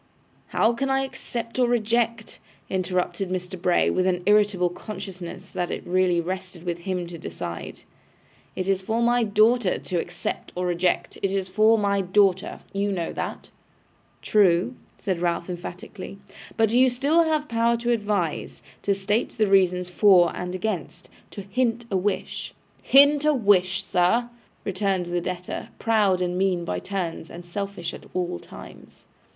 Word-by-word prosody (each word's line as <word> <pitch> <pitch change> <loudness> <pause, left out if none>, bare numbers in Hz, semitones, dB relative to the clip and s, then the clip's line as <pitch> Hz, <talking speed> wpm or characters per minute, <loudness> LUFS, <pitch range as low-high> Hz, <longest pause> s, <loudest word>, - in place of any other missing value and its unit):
'How 225 - +2
can 270 +3 -2
I 270 0 +2
accept 245 -3 -5
or 250 - +4
reject,' 230 -1 0 0.3
interrupted 185 0 -1
Mr. 180 0 -4
Bray, 180 -1 +3
with 185 0 +1
an 180 -1 0
irritable 205 -3 +3
consciousness 185 -1 -8
that 175 - -2
it - - -5
really 180 -1 +2
rested 185 0 -5
with 175 -1 -3
him 180 0 -3
to 170 -1 -9
decide. 85 - -7 0.7
'It 185 - -3
is 195 -1 +1
for 225 +4 0
my 240 +1 +3
daughter 215 0 +3
to 180 -2 -3
accept 175 +1 -5
or 180 0 -1
reject; 175 0 0
it 195 - +1
is 195 -1 -1
for 215 +4 +4
my 200 -1 +1
daughter. 190 0 +2
You 200 +1 0
know 175 -4 -2
that.' - - -5 0.7
'True,' 195 +2 +3 0.2
said 190 -5 -2
Ralph, 170 0 -1
emphatically; 180 +2 -8 0.4
'but 225 -1 +3
you 250 +2 +5
have 255 - +1
still 290 +7 +3
the 310 -2 0
power 235 -2 +1
to 240 +1 -1
advise; 205 -8 -1 0.2
to 200 - +1
state 205 +4 0
the 220 - +2
reasons 185 -2 +3
for 180 -1 +5
and 180 0 -4
against; 185 -3 -4 0.2
to 200 - -8
hint 235 +3 -1
a - - +1
wish.' 195 +2 -2 0.3
'To - - -23
hint 285 +2 +6
a 305 -1 +4
wish, 190 -5 +3
sir!' 230 +7 +2 0.3
returned 195 -2 0
the 175 0 -2
debtor, 180 0 -5
proud 210 -5 +2
and 180 0 -1
mean 185 -3 +1
by - - -2
turns, 180 -4 -4
and 175 +1 -10
selfish 195 0 -4
at - - -10
all 175 - -1
times. - - -13
195 Hz, 160 wpm, -25 LUFS, 180-220 Hz, 0.7 s, hint